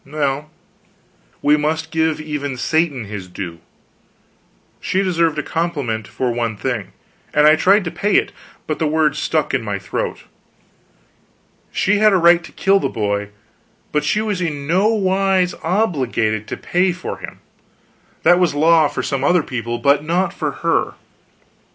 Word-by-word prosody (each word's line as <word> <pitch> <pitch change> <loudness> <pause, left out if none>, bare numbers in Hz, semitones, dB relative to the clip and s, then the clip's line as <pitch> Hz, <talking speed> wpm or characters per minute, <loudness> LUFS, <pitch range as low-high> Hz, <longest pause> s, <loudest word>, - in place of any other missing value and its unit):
Well, 145 0 -2 0.9
we 150 +1 +4
must 160 +2 -2
give 160 -1 +1
even 145 -3 -4
Satan 150 -3 0
his 100 -2 -7
due. 90 -2 -7 1.2
She 190 +1 0
deserved 165 -4 +1
a 150 - -1
compliment 145 -11 -2
for 125 -2 -2
one 115 -3 -2
thing; 115 -4 -3 0.4
and 150 0 +5
I 155 +1 +7
tried 195 +6 +4
to 165 - -4
pay 205 0 0
it, - - +3 0.3
but 155 - -3
the 160 - +1
words 155 0 +1
stuck 155 -2 0
in 130 - +1
my 105 -2 -3
throat. 95 -2 -4 1.5
She 200 +1 +1
had 215 -1 +5
a - - +5
right 170 0 +5
to - - -12
kill 195 +1 +2
the - - -1
boy, 100 -1 -2 0.6
but 150 - 0
she 215 - +1
was 210 -4 -2
in 150 -5 -3
no 185 +7 +2
wise 190 -3 +1
obliged 130 - 0
to - - -5
pay 180 +1 +1
for 180 - -6
him. - - -9 0.8
That 175 0 +5
was 175 -5 +2
law 160 +1 +5
for - - -4
some 140 -2 -2
other 175 +2 +3
people, 120 -2 -4
but 140 +3 +2
not 175 +3 0
for - - -2 0.2
her. - - +1
155 Hz, 160 wpm, -19 LUFS, 130-180 Hz, 1.5 s, I